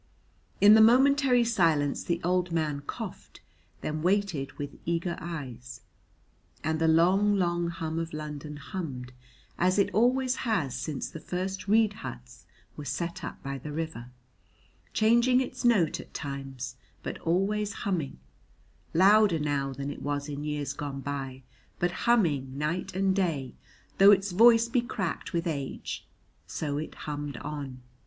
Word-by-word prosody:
In 205 +1 +8
the 220 - +8
momentary 260 +2 +5
silence 165 -11 +2
the 170 -1 -1
old 180 0 +1
man 155 -3 -1
coughed, - - -7 0.4
then 155 0 -3
waited 180 -6 0
with 145 -1 -7
eager 170 +1 -1
eyes; 125 -7 -7 0.8
and 160 0 0
the 165 - +4
long 185 +6 +4
long 175 -2 +1
hum 165 -1 -3
of 165 0 -4
London 150 -1 -6
hummed 140 -6 -6 0.5
as 185 +2 +3
it 200 - +2
always 255 +3 +2
has 190 - 0
since 150 -4 -4
first 185 +4 -4
the - - 0
reed 220 -1 +4
huts 125 -1 -9 0.3
were 150 - -7
set 170 +4 -3
up - - -7
by 135 0 -4
the 150 +4 -7
river, 155 -6 -5 0.8
changing 235 +3 +4
its 255 -1 -4
note 210 -10 +3
at - - -12
times 135 -3 -5 0.3
but - - -5
always 200 +5 0
humming, 170 - -1 0.8
louder 200 0 +6
now 145 -2 -1
than 140 +1 -4
it - - -9
was 145 0 -2
in 145 0 -5
years 150 -2 -2
gone 140 -1 -5
by, 135 -1 -5 0.3
but 175 0 +1 0.2
humming 145 - +2
night 165 +5 -2
and 190 0 +2
day 160 -9 -1 0.5
though 195 +1 +9
its 195 -1 +3
voice 230 +4 +6
be 240 +1 +1
cracked 190 -7 -3
with 170 0 -1
age; 140 -5 -4 0.4
so 145 -2 -3
it 155 - -6
hummed 145 -1 -4
on. 140 -4 -6
165 Hz, 150 wpm, -28 LUFS, 145-195 Hz, 0.8 s, though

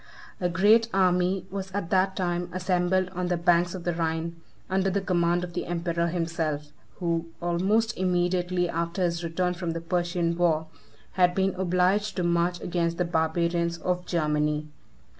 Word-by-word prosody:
A 180 - 0
great 210 +6 +4
army 185 0 +2
was 190 -1 -5
at 200 -4 -3
that 190 0 +2
time 175 -1 -1
assembled 185 0 +1
on 180 0 -3
the 175 -1 0
banks 175 +1 +2
of 180 - -7
the 175 - 0
Rhine, 165 0 -2 0.3
under 190 0 +1
the 195 +1 0
command 175 -2 +1
of 175 -1 -6
the 175 - -3
emperor 170 -1 -1
himself, 165 -3 -2 0.2
who, 170 -2 -1
almost 190 +6 +1
immediately 180 0 +1
after 170 +2 -2
his 170 -1 -1
return 180 +2 0
from 170 -2 -3
the 165 - -3
Persian 175 0 0
war, 165 -2 +2 0.5
had 180 -1 +3
been 190 0 +1
obliged 190 +3 +1
to 180 - -1
march 175 +1 +1
against 170 -1 -1
the 180 - +1
barbarians 170 +1 0
of 180 +1 -1
Germany. 150 -2 0
175 Hz, 160 wpm, -27 LUFS, 170-185 Hz, 0.5 s, great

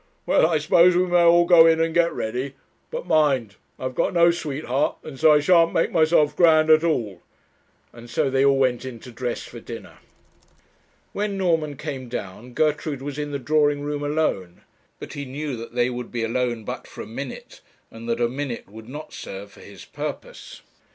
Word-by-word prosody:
Well, - - +4
I 165 -1 +1
suppose 170 +4 +4
we 180 - +3
may 175 -1 +3
all 170 0 +5
go 170 -2 +7
in 160 0 +4
and 165 0 0
get 170 0 +3
ready; 125 +5 -4 0.3
but - - -5
mind, 135 -9 +1 0.2
I - - -10
have 130 0 -3
got 150 - -1
no 170 0 +6
sweetheart, 145 -4 -2
and 140 -4 -10
so 160 0 +6
I 150 - +5
shan't 165 +2 +4
make 165 - +1
myself 155 -2 +3
grand 160 -2 +5
at 155 +1 +6
all;' 115 - -1 0.7
and 120 0 -13
so 120 - 0
they 135 0 +1
all 140 0 +4
went 130 -2 +1
in 130 -3 -7
to 125 - -11
dress 120 +1 -4
for - - -10
dinner. - - -10 1.1
When 205 -1 -2
Norman 165 -6 0
came 130 -5 -6
down, 115 +2 -7
Gertrude 150 -1 -1
was 145 0 -5
in 145 0 -3
the 145 - -3
drawing 145 +2 +1
room 145 0 -3
alone. 145 - -2 0.4
But - - -9
he 145 - -5
knew 140 +1 -5
that 115 +1 -9
they 125 0 +1
would 125 -1 -6
be 120 -1 -2
alone 120 0 -1
but - - -7
for - - -10
a - - -10
minute, 130 +4 -8 0.3
and 115 +1 -9
that 115 0 -1
a 120 - +2
minute 130 -1 -5
would 110 +3 -12
not 150 +3 -9
serve 100 +1 -8
for - - -17
his - - -13
purpose. - - -8
145 Hz, 200 wpm, -23 LUFS, 125-160 Hz, 1.1 s, go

